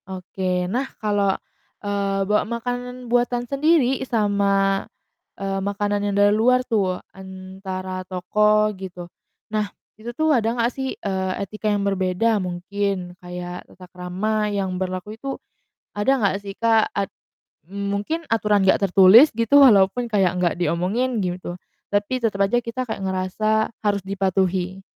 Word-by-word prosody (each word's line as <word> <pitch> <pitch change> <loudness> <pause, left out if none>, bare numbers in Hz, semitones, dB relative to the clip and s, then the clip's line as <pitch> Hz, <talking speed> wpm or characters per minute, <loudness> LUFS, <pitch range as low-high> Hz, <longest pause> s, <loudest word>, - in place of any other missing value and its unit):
Oke. 185 -1 -2
Nah 250 +9 -2
kalau, 205 -2 +1 0.5
eee, 200 -1 -1
bawa 210 +2 +2
makanan 245 +1 -4
buatan 245 0 +1
sendiri 275 0 +2
sama, 200 -3 +2 0.6
eee, 195 0 -2
makanan 205 +1 -1
yang 205 -1 -1
dari 205 0 +5
luar 250 +4 +3
tuh, 195 -7 0 0.2
antara 190 0 -7
toko 210 +3 +2
gitu, 185 -2 -8 0.5
nah, 210 -1 0 0.3
itu 235 - -6
tuh 315 -1 +3
ada 230 -2 +1
gak 235 +1 +1
sih, 265 -1 -4
eee, 190 -2 -2
etika 215 +2 -4
yang 205 -1 0
berbeda 195 +3 +1
mungkin 185 +1 -3
kayak 180 0 -7
tata 185 - -14
krama 205 +4 -1
yang 195 -2 -2
berlaku 185 +3 -4
itu, 275 0 -4 0.6
ada 205 +5 +2
enggak 205 -7 +1
sih, 200 -1 -8
Kak? 225 0 +2
At 200 -1 -1 0.6
eee, 200 +1 -5
mungkin 315 +12 -3
aturan 210 -5 +2
gak 190 - +4
tertulis 195 - +8
gitu 230 +6 +4
walaupun 230 -1 +5
kayak 195 -5 +2
enggak 180 -2 +1
diomongin 200 +8 0
gitu. 180 -1 -4 0.4
Tapi 205 +5 +1
tetep 225 -5 -1
aja 200 +5 +3
kita 235 +2 -3
kayak 220 - -4
ngerasa 215 +4 0 0.2
harus 200 -1 +1
dipatuhi. 190 -1 -1
200 Hz, 140 wpm, -22 LUFS, 190-225 Hz, 0.6 s, tertulis